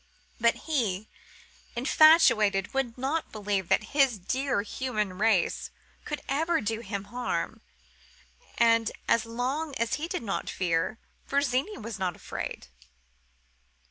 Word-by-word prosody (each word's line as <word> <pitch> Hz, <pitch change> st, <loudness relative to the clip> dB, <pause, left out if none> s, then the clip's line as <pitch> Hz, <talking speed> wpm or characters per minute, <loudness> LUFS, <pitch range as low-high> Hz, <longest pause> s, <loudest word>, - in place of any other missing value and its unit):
But 235 Hz, 0 st, +4 dB
he, 220 Hz, -, -1 dB, 0.7 s
infatuated, 235 Hz, -, +5 dB
would 265 Hz, -3 st, -1 dB
not 280 Hz, +6 st, -2 dB
believe 205 Hz, -4 st, -2 dB
that 215 Hz, -, +2 dB
his 270 Hz, -6 st, +4 dB
dear 255 Hz, +3 st, -1 dB
Human 210 Hz, -5 st, -3 dB
Race 210 Hz, -5 st, +2 dB, 0.4 s
could 300 Hz, -, -4 dB
ever 320 Hz, +5 st, +1 dB
do 220 Hz, +1 st, -2 dB
him 200 Hz, -3 st, -4 dB
harm; 245 Hz, +5 st, -3 dB, 1.0 s
and, 230 Hz, -1 st, +4 dB, 0.2 s
as 230 Hz, -1 st, +2 dB
long 265 Hz, +6 st, -2 dB
as 235 Hz, 0 st, -1 dB
he 325 Hz, -, -2 dB
did 360 Hz, -6 st, -3 dB
not 200 Hz, -3 st, -3 dB
fear, 180 Hz, +3 st, 0 dB, 0.3 s
Virginie 280 Hz, -, 0 dB
was 220 Hz, -2 st, -6 dB
not 180 Hz, -3 st, -1 dB
afraid. -, -, -6 dB
230 Hz, 120 wpm, -28 LUFS, 205-270 Hz, 1.0 s, infatuated